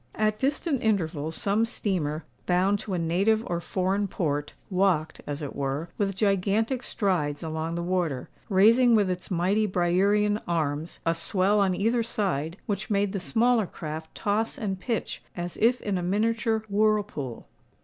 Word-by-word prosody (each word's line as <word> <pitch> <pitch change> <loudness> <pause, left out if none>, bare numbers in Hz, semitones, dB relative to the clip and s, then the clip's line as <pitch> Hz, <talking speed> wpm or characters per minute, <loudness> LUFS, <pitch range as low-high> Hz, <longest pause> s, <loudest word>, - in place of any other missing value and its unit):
At 215 0 +1
distant 285 0 0
intervals 160 -7 0
some 205 +3 +1
steamer, 175 -9 -1 0.2
bound 185 +3 +3
to 200 -3 -4
a - - 0
native 195 +7 +2
or 170 -1 -2
foreign 190 +3 0
port, 145 -6 -2 0.2
walked, 180 -4 +1
as 145 +1 -4
it 145 - -5
were, 140 +4 -2
with 200 -2 0
gigantic 205 +5 +1
strides 165 - -1
along 160 +1 -3
the 170 - -2
water, 175 -7 -1 0.2
raising 230 +5 +6
with 205 -4 +3
its 180 0 -5
mighty 195 +4 +2
Briarean 200 +4 +2
arms, 160 -1 -2
a 165 - +3
swell 190 +4 +1
on 190 -2 +2
either 230 +5 +1
side, 185 -8 -2
which 205 - -3
made 200 -1 +1
the 200 - -1
smaller 225 +2 +2
craft 160 0 -7
toss 215 +2 -1
and 195 -3 -3
pitch 225 +2 -3 0.2
as 175 0 -4
if 240 +3 +3
in 200 -3 -1
a - - -3
miniature 220 +4 +1
whirlpool. 205 - 0
195 Hz, 160 wpm, -27 LUFS, 170-215 Hz, 0.2 s, raising